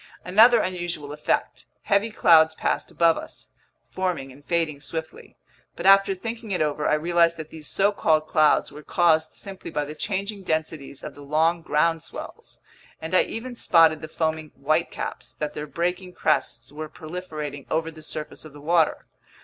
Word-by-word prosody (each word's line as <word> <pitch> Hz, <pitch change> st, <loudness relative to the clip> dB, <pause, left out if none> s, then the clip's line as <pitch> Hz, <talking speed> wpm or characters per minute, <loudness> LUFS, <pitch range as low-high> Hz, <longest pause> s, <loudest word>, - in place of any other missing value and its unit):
Another 225 Hz, +5 st, +6 dB
unusual 175 Hz, -5 st, -4 dB
effect. 150 Hz, -, -2 dB, 0.2 s
Heavy 200 Hz, +2 st, +2 dB
clouds 160 Hz, -6 st, +5 dB
passed -, -, -1 dB
above 165 Hz, -1 st, +3 dB
us, -, -, -9 dB, 0.4 s
forming 180 Hz, -8 st, -3 dB
and 140 Hz, +3 st, -16 dB
fading 160 Hz, -3 st, -1 dB
swiftly. 160 Hz, +1 st, -7 dB, 0.4 s
But -, -, -6 dB
after 195 Hz, 0 st, +6 dB
thinking 225 Hz, +3 st, -6 dB
it 185 Hz, -, -1 dB
over, 150 Hz, -1 st, 0 dB
I -, -, +4 dB
realized 170 Hz, +1 st, +2 dB
that 155 Hz, -1 st, -8 dB
these 155 Hz, -2 st, -9 dB
so 200 Hz, +1 st, +2 dB
called 155 Hz, -6 st, +2 dB
clouds 155 Hz, -1 st, +3 dB
were 150 Hz, -, -10 dB
caused 160 Hz, 0 st, +2 dB
simply 195 Hz, -1 st, -8 dB
by 150 Hz, -3 st, -2 dB
the 150 Hz, -, -7 dB
changing 200 Hz, +4 st, -3 dB
densities 155 Hz, -5 st, -3 dB
of -, -, -6 dB
the 145 Hz, -, -13 dB
long 160 Hz, +4 st, +1 dB
ground 165 Hz, 0 st, +1 dB
swells, -, -, -9 dB, 0.4 s
and 160 Hz, +3 st, -7 dB
I 185 Hz, -, +6 dB
even 245 Hz, +3 st, -6 dB
spotted 165 Hz, -8 st, +4 dB
the 155 Hz, -, -6 dB
foaming 160 Hz, -1 st, -2 dB
"white 155 Hz, +4 st, +1 dB
caps" -, -, -6 dB
that 150 Hz, -1 st, -4 dB
their 150 Hz, -, -5 dB
breaking 180 Hz, +3 st, -2 dB
crests 130 Hz, -7 st, 0 dB
were 155 Hz, +1 st, -7 dB
proliferating 155 Hz, -4 st, -7 dB
over 160 Hz, +1 st, -1 dB
the 160 Hz, 0 st, -13 dB
surface 155 Hz, 0 st, -5 dB
of 155 Hz, -3 st, -12 dB
the 145 Hz, -, -12 dB
water. 160 Hz, +1 st, +1 dB
160 Hz, 175 wpm, -24 LUFS, 150-180 Hz, 0.4 s, Another